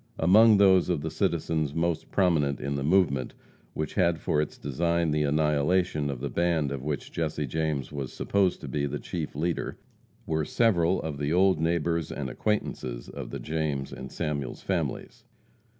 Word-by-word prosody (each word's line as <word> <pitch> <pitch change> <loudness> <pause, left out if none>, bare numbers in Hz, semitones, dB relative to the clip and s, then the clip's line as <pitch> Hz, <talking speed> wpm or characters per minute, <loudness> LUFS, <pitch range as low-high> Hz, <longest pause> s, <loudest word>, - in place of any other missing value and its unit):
Among 105 +6 +6
those 95 -3 +5
of 85 -5 0
the 80 +1 -4
citizens 80 -5 -1
most 80 -1 -1
prominent 80 -7 +2
in 70 - -3
the 70 - -2
movement 75 -5 +2 0.4
which 75 -2 -3
had 85 -1 +2
for 75 - +1
its 75 - -5
design 85 +3 0
the 75 0 +1
annihilation 75 +2 +1
of 65 -3 -4
the 70 - -2
band 85 -4 +1
of 70 -2 -4
which 75 0 -4
Jesse 75 -2 -2
James 75 0 -2
was 70 -3 -5
supposed 100 -3 0
to - - -7
be 70 -1 -1
the 70 +1 -3
chief 80 -1 -5
leader, 85 +3 -2 0.5
were 80 -1 0
several 90 -2 +2
of 75 -3 -4
the 75 +1 -1
old 95 0 +4
neighbors 85 0 0
and 65 -3 -4
acquaintances 65 - -2
of - - -7
the - - -5
James 75 -3 -2
and 65 0 -8
Samuels 70 -4 -3
families. - - -3
80 Hz, 170 wpm, -27 LUFS, 70-85 Hz, 0.5 s, Among